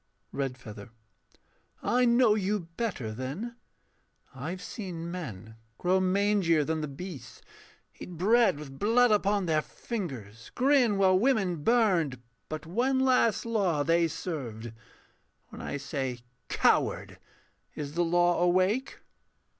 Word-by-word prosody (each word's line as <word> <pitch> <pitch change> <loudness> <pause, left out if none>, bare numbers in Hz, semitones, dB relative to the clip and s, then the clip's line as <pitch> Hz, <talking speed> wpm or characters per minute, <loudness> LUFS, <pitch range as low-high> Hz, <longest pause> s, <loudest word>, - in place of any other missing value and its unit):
REDFEATHER. 125 -6 -5 0.9
I 250 +1 +3
know 240 -2 +5
you 210 0 0
better, 155 - -3
then. 140 - -5 0.8
I 135 +4 -6
have 180 +1 -6
seen 170 -5 -6
men 115 - -7 0.2
grow 185 +1 +2
mangier 185 -4 +2
than 160 0 -1
the 150 - -3
beasts, 150 +2 -9 0.6
Eat - - -8
bread 225 +1 +4
with 135 -2 -10
blood 235 +3 +4
upon 205 -1 +2
their 155 -2 +2
fingers, 130 - -7
grin 255 -5 +3
While 185 -1 +4
women 210 -8 +2
burned: 185 - +2 0.3
but 155 0 -5
one 250 +10 +1
last 250 -5 +3
law 195 -10 +1
they 165 +2 +3
served. 120 -10 -6 0.8
When - - -10
I 140 - -4
say 135 -3 -4 0.3
'Coward,' - - +1 0.6
is 145 -1 -5
the 175 +2 +1
law 175 0 +2
awake? 185 +8 +1
175 Hz, 120 wpm, -29 LUFS, 145-215 Hz, 0.9 s, know